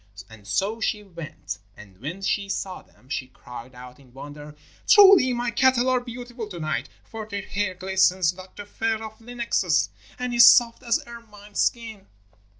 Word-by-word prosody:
And 105 Hz, -2 st, -14 dB
so 200 Hz, -, -1 dB
she 210 Hz, -1 st, -1 dB
went, 165 Hz, -, -8 dB, 0.2 s
and 100 Hz, -3 st, -15 dB
when 165 Hz, -, -6 dB
she 200 Hz, 0 st, -1 dB
saw 190 Hz, -1 st, -4 dB
them 125 Hz, -, -26 dB
she 135 Hz, -2 st, -4 dB
cried 125 Hz, 0 st, -12 dB
out 125 Hz, +1 st, -12 dB
in 130 Hz, -3 st, -20 dB
wonder: 145 Hz, +2 st, -10 dB, 0.3 s
'Truly 390 Hz, -10 st, +8 dB
my 240 Hz, -1 st, -1 dB
cattle 260 Hz, +1 st, +3 dB
are 255 Hz, -1 st, +3 dB
beautiful 245 Hz, -1 st, -8 dB
to 180 Hz, -4 st, -8 dB
night, 155 Hz, -1 st, -3 dB
for 220 Hz, -1 st, -8 dB
their 200 Hz, -2 st, -5 dB
hair 200 Hz, -1 st, -2 dB
glistens 185 Hz, -1 st, +2 dB
like 185 Hz, +1 st, -13 dB
the 205 Hz, -, -8 dB
fur 225 Hz, +1 st, -2 dB
of 220 Hz, 0 st, -10 dB
lynxes, 240 Hz, 0 st, 0 dB, 0.3 s
and 250 Hz, -1 st, -3 dB
is 235 Hz, 0 st, +7 dB
soft 235 Hz, -1 st, +5 dB
as 235 Hz, -2 st, 0 dB
ermine 210 Hz, -3 st, -13 dB
skin.' 220 Hz, -2 st, -2 dB
205 Hz, 170 wpm, -24 LUFS, 155-235 Hz, 0.3 s, Truly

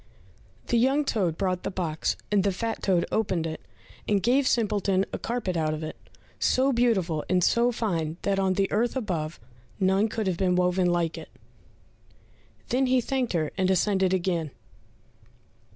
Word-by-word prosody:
The 240 Hz, -, +1 dB
young 270 Hz, +5 st, +2 dB
toad 185 Hz, -, 0 dB
brought 185 Hz, -2 st, -1 dB
the -, -, -3 dB
box, 170 Hz, -5 st, -2 dB
and 200 Hz, -2 st, +3 dB
the 200 Hz, -, +2 dB
fat 225 Hz, +4 st, -3 dB
toad 180 Hz, -3 st, +2 dB
opened 190 Hz, -7 st, 0 dB
it, 160 Hz, -1 st, -5 dB, 0.5 s
and 205 Hz, -2 st, +1 dB
gave 255 Hz, +3 st, +3 dB
Simpleton 205 Hz, -5 st, +1 dB
a -, -, -3 dB
carpet 230 Hz, -6 st, -2 dB
out 155 Hz, -1 st, 0 dB
of 155 Hz, -, -6 dB
it, 155 Hz, -, -5 dB, 0.4 s
so 265 Hz, +1 st, +2 dB
beautiful 190 Hz, -10 st, +1 dB
and 180 Hz, 0 st, +2 dB
so 235 Hz, +5 st, +3 dB
fine, 170 Hz, -9 st, -2 dB
that 195 Hz, -1 st, +1 dB
on 190 Hz, -1 st, +2 dB
the 195 Hz, +1 st, 0 dB
earth 230 Hz, +4 st, +1 dB
above, 170 Hz, -10 st, -3 dB, 0.4 s
none 190 Hz, +2 st, +3 dB
could 220 Hz, 0 st, -3 dB
have 185 Hz, -3 st, 0 dB
been 180 Hz, -1 st, +1 dB
woven 180 Hz, 0 st, +2 dB
like 170 Hz, -1 st, -1 dB
it. -, -, -11 dB, 1.4 s
Then 260 Hz, +1 st, +2 dB
he 255 Hz, 0 st, +3 dB
thanked 255 Hz, -1 st, -1 dB
her, 155 Hz, -3 st, 0 dB
and 185 Hz, 0 st, +2 dB
ascended 190 Hz, 0 st, +2 dB
again. 175 Hz, -4 st, 0 dB
190 Hz, 170 wpm, -26 LUFS, 175-230 Hz, 1.4 s, and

